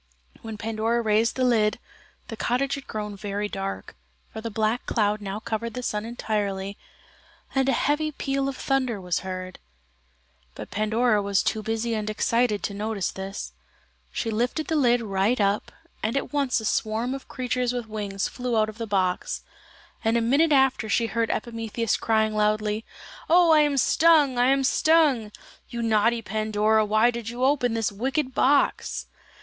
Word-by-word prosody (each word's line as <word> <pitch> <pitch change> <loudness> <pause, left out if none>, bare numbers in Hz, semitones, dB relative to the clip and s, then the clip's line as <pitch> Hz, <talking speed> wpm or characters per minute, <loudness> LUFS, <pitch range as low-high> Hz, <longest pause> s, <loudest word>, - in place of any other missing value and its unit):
When 225 -1 -7
Pandora 225 +2 -1
raised 220 +1 +2
the 260 - 0
lid, 220 -4 +3 0.5
the 225 - -6
cottage 255 +5 0
had 275 - -6
grown 210 -1 -4
very 205 +1 -3
dark, 195 -1 -5 0.4
for 220 - -6
the 230 - -4
black 220 +2 -1
cloud 210 -2 +1
now 195 0 -4
covered 230 +1 -4
the 250 - -4
sun 210 -2 -2
entirely 205 -4 -2 0.8
and 270 0 +2
a - - +3
heavy 305 +2 +1
peal 275 -1 -1
of 270 - -6
thunder 260 -6 0
was 180 -2 -1
heard. 185 -1 -6 1.0
But - - -8
Pandora 215 +2 +2
was 200 -1 +1
too 220 - 0
busy 225 +2 -2
and 215 -1 -2
excited 220 0 +1
to 205 - -2
notice 210 -1 -2
this: 195 +1 -6 0.6
she 225 - -2
lifted 245 +8 -1
the 320 - +1
lid 245 -5 +3
right 205 +3 0
up, 200 0 +1 0.3
and 220 +5 -1
at 275 - -3
once 275 -4 +1
a 220 - -6
swarm 225 +4 0
of 270 - -7
creatures 250 -1 -1
with 245 -2 -3
wings 205 -2 -3
flew 245 -2 -2
out 215 0 +2
of 215 +1 -10
the 230 - -3
box, 185 -3 -1 0.6
and 225 +1 +2
a - - +1
minute 280 +8 +3
after 265 -5 +3
she 230 +3 +2
heard 230 0 -1
Epimetheus 230 -1 -2
crying 220 -1 +1
loudly: 215 0 0 0.5
"Oh, 345 0 +6
I 310 - +7
am 295 -2 +2
stung, 295 -3 +4
I 245 - +4
am 270 0 +3
stung! 280 -6 +3 0.4
You 235 -1 -4
naughty 230 +1 +2
Pandora, 215 +1 +1
why 215 +3 +3
did 235 -2 -5
you 240 +2 -4
open 255 -4 +2
this 225 -2 0
wicked 260 +6 -2
box?" 280 +3 +2
225 Hz, 170 wpm, -25 LUFS, 210-250 Hz, 1.0 s, I